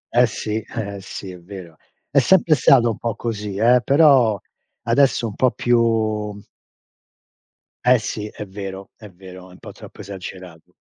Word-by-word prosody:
Eh 125 Hz, 0 st, +5 dB
sì, 110 Hz, -1 st, -4 dB, 0.2 s
eh 100 Hz, -3 st, -4 dB
eh, 95 Hz, -, -10 dB
sì, 95 Hz, 0 st, -8 dB
è 90 Hz, -, -11 dB
vero. 90 Hz, -2 st, -11 dB, 0.4 s
È 140 Hz, -, +4 dB
sempre 165 Hz, +3 st, +4 dB
stato 130 Hz, -4 st, +4 dB
un 110 Hz, -, -6 dB
po' 115 Hz, -2 st, -3 dB
così, 105 Hz, -4 st, -5 dB
eh, 120 Hz, +2 st, +4 dB
però 135 Hz, -, +4 dB, 0.4 s
adesso 120 Hz, +1 st, +2 dB
un 110 Hz, -, -4 dB
po' 130 Hz, +4 st, +2 dB
più 110 Hz, -4 st, 0 dB, 1.5 s
Eh 125 Hz, 0 st, +5 dB
sì, 105 Hz, 0 st, -5 dB
è 105 Hz, -, -8 dB
vero 95 Hz, 0 st, -8 dB
è 105 Hz, -2 st, -13 dB
vero, 95 Hz, 0 st, -13 dB
è -, -, -16 dB
un 90 Hz, -, -16 dB
po' -, -, -11 dB
troppo -, -, -14 dB
esagerato. 95 Hz, -4 st, -10 dB
105 Hz, 165 wpm, -21 LUFS, 95-120 Hz, 1.5 s, Eh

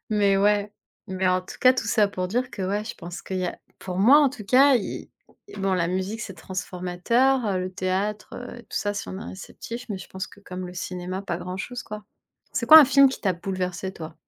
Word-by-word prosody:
Mais 200 Hz, -2 st, +3 dB
ouais. 205 Hz, +1 st, +2 dB, 0.4 s
Mais 190 Hz, 0 st, -1 dB
en 185 Hz, 0 st, +2 dB
tout 185 Hz, -, -11 dB
cas, 255 Hz, -, +7 dB
tout 255 Hz, -4 st, -3 dB
ça 210 Hz, -1 st, +3 dB
pour 185 Hz, -2 st, -3 dB
dire 245 Hz, +4 st, -1 dB
que 195 Hz, -, -6 dB
ouais, 205 Hz, +3 st, -1 dB
je 225 Hz, -, -6 dB
pense 175 Hz, 0 st, -8 dB
qu'il 190 Hz, -, -4 dB
y 185 Hz, -, -1 dB
a, -, -, -5 dB, 0.2 s
pour 185 Hz, -1 st, -5 dB
moi 255 Hz, +9 st, +7 dB
en 280 Hz, -, +4 dB
tout 245 Hz, -5 st, -9 dB
cas, 265 Hz, +5 st, +6 dB
il 215 Hz, -, -5 dB, 0.5 s
bon 195 Hz, -1 st, +1 dB
la 175 Hz, -2 st, +1 dB
musique 190 Hz, +4 st, -2 dB
c'est 195 Hz, -, -6 dB
transformateur, 190 Hz, +6 st, 0 dB
le 185 Hz, 0 st, -2 dB
théâtre, 195 Hz, +3 st, -2 dB
heu, 245 Hz, 0 st, -8 dB
tout -, -, -27 dB
ça, 205 Hz, 0 st, -2 dB
si 205 Hz, -, -5 dB
on 190 Hz, -, -6 dB
est -, -, -7 dB
réceptif, 235 Hz, +5 st, -8 dB
mais 200 Hz, -3 st, -4 dB
je 185 Hz, -, -11 dB
pense 190 Hz, 0 st, -5 dB
que -, -, -17 dB
comme 185 Hz, -2 st, -7 dB
le 180 Hz, -, -9 dB
cinéma, 180 Hz, +1 st, -5 dB
pas 175 Hz, -4 st, -3 dB
grand 180 Hz, +1 st, -6 dB
chose, 245 Hz, +4 st, -5 dB
quoi. 210 Hz, -2 st, -8 dB, 0.5 s
C'est -, -, -2 dB
quoi 315 Hz, -, +12 dB
un 305 Hz, -, +9 dB
film 275 Hz, +1 st, +6 dB
qui 265 Hz, -, -6 dB
t'a 190 Hz, -, +1 dB
bouleversé 185 Hz, +1 st, -4 dB
toi? 160 Hz, -2 st, -9 dB
195 Hz, 235 wpm, -25 LUFS, 185-225 Hz, 0.5 s, quoi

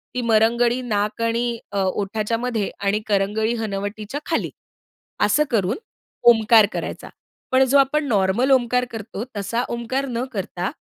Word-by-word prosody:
ती 250 Hz, -, 0 dB
मरंगळी 235 Hz, +2 st, +2 dB
नाक 210 Hz, -2 st, -2 dB
आणि 230 Hz, +1 st, 0 dB, 0.3 s
अ, 200 Hz, -1 st, -1 dB
ओठच्यामध्ये 215 Hz, +3 st, -1 dB
आणि 200 Hz, +1 st, 0 dB
करंगळी 210 Hz, +2 st, +1 dB
हनवटीच्या 210 Hz, +4 st, -4 dB
खाली, 325 Hz, -, -1 dB, 0.7 s
असं 290 Hz, +9 st, +3 dB
करून 200 Hz, -3 st, +1 dB, 0.5 s
ओमकार 225 Hz, -1 st, +6 dB
करायचा. -, -, -5 dB, 0.4 s
पण 260 Hz, +1 st, +5 dB
जो 270 Hz, +2 st, +4 dB
आपण 280 Hz, +2 st, +2 dB
नॉर्मल 210 Hz, +4 st, +2 dB
ओमकार 250 Hz, -1 st, +3 dB
करतो, 220 Hz, -1 st, -6 dB
तसा 230 Hz, +5 st, -1 dB
ओमकार 235 Hz, +4 st, -2 dB
न 240 Hz, 0 st, -2 dB
करता, 185 Hz, -3 st, -3 dB
225 Hz, 135 wpm, -22 LUFS, 205-245 Hz, 0.7 s, ओमकार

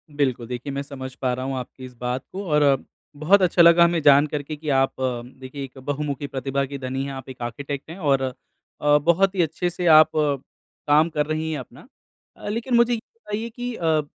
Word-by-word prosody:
बिल्कुल, 130 Hz, -5 st, 0 dB
देखिए 125 Hz, +3 st, -5 dB
मैं 140 Hz, -, -2 dB
समझ 130 Hz, -2 st, -8 dB
पा 125 Hz, -2 st, -1 dB
रहा 130 Hz, +1 st, -4 dB
हूँ 135 Hz, 0 st, -3 dB
आपकी 130 Hz, +1 st, -8 dB
इस 125 Hz, -, -11 dB
बात 125 Hz, +1 st, -3 dB
को। 195 Hz, +2 st, -5 dB
और 145 Hz, -3 st, +3 dB, 0.3 s
बहुत 180 Hz, +7 st, +4 dB
अच्छा 180 Hz, -1 st, +4 dB
लगा 170 Hz, 0 st, +7 dB
हमें 170 Hz, -1 st, +2 dB
जान 145 Hz, +1 st, +6 dB
करके 150 Hz, 0 st, -4 dB
कि 150 Hz, 0 st, -6 dB
आप 135 Hz, -1 st, +2 dB, 0.5 s
देखिए 130 Hz, +2 st, -7 dB
एक 135 Hz, 0 st, -10 dB
बहुमुखी 145 Hz, +1 st, -3 dB
प्रतिभा 135 Hz, 0 st, -2 dB
की 140 Hz, +1 st, -7 dB
धनी 130 Hz, +1 st, -3 dB
है, 140 Hz, -, -5 dB
आप 135 Hz, -1 st, -8 dB
एक 130 Hz, -1 st, -10 dB
आर्किटेक्ट 140 Hz, +5 st, -5 dB
हैं 170 Hz, -, -8 dB
और 140 Hz, -6 st, +1 dB, 0.6 s
अ, 150 Hz, 0 st, +5 dB
बहुत 175 Hz, +6 st, +2 dB
ही 180 Hz, -, +2 dB
अच्छे 165 Hz, +2 st, -1 dB
से 175 Hz, +1 st, -5 dB
आप 155 Hz, 0 st, +7 dB
काम 150 Hz, +2 st, 0 dB
कर 150 Hz, -2 st, -1 dB
रही 155 Hz, +1 st, -2 dB
है 150 Hz, -, -2 dB
अपना। 130 Hz, -, -12 dB, 0.5 s
अ, -, -, -10 dB
लेकिन 235 Hz, +3 st, -1 dB
मुझे 235 Hz, +1 st, +4 dB
ये 230 Hz, -, -1 dB, 0.2 s
बताइए 225 Hz, -, -5 dB
कि 245 Hz, +1 st, -5 dB
अ, 160 Hz, -2 st, +1 dB
145 Hz, 210 wpm, -23 LUFS, 135-170 Hz, 0.6 s, लगा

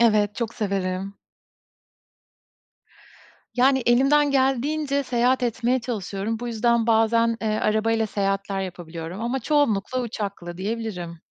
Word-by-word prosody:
Evet, 210 Hz, -3 st, +3 dB
çok 230 Hz, +1 st, -3 dB
severim. 195 Hz, -1 st, -2 dB, 2.4 s
Yani, 265 Hz, +2 st, +4 dB
elimden 275 Hz, +4 st, +4 dB
geldiğince 280 Hz, +2 st, +1 dB
seyahat 250 Hz, 0 st, +1 dB
etmeye 245 Hz, +1 st, +1 dB
çalışıyorum. 215 Hz, -2 st, -3 dB
Bu 240 Hz, -, -5 dB
yüzden 235 Hz, 0 st, +1 dB
bazen, 230 Hz, 0 st, +3 dB
eee, 220 Hz, -, -3 dB
arabayla 220 Hz, +1 st, +1 dB
seyahatler 195 Hz, -1 st, -1 dB
yapabiliyorum 175 Hz, -1 st, -6 dB
ama 240 Hz, +3 st, -1 dB
çoğunlukla 255 Hz, -4 st, +1 dB
uçakla 200 Hz, -7 st, -5 dB
diyebilirim. 190 Hz, -5 st, -4 dB
225 Hz, 105 wpm, -24 LUFS, 200-250 Hz, 2.4 s, Yani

